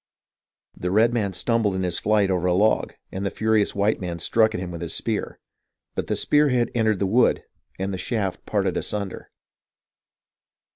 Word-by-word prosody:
The 90 - -3
redman 110 0 +2
stumbled 110 0 +1
in 95 - -1
his 90 -2 -1
flight 105 -2 +2
over 90 -1 0
a 90 - +2
log, 105 +4 +2 0.2
and 95 - -4
the 100 - 0
furious 110 -1 +1
white 100 +1 +1
man 90 -2 -4
struck 110 +6 +2
at - - -2
him 90 -1 -5
with 85 -1 -7
his 85 - -4
spear; - - -3 0.6
but - - -3
the - - 0
spear 150 0 +3
head 120 -2 +1
entered 110 -3 +2
the 100 - 0
wood, 115 +6 +3 0.3
and 95 +1 -3
the 95 - -4
shaft 100 -5 -2
parted 100 -4 0
asunder. 100 -2 -4
100 Hz, 180 wpm, -24 LUFS, 95-110 Hz, 0.6 s, spear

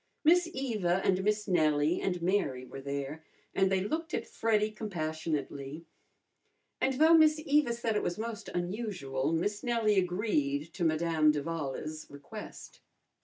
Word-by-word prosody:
Miss 340 +2 +5
Eva 215 - 0
and 190 0 +2
Miss 210 +1 0
Nellie 155 -2 +2
and 180 -3 -2
Mary 170 -9 0
were 135 - -9
there, 140 +3 -4 0.3
and 190 0 +2
they 190 -1 +2
looked 320 - -2
at - - -3
Freddy 215 -1 +1
compassionately. 155 -6 -4 1.0
And 265 0 +2
though 315 +4 +6
Miss 310 -1 +6
Eva 290 -4 +3
said 235 -2 -1
it 210 - +2
was 175 - -2
most 225 -1 -5
unusual, 175 - -2
Miss 205 +6 -1
Nellie 230 -5 +2
agreed 165 -6 -1
to 180 - -3
Madame 160 -1 +3
d'Avala's 155 0 -4
request. 145 0 -10
180 Hz, 140 wpm, -31 LUFS, 155-220 Hz, 1.0 s, though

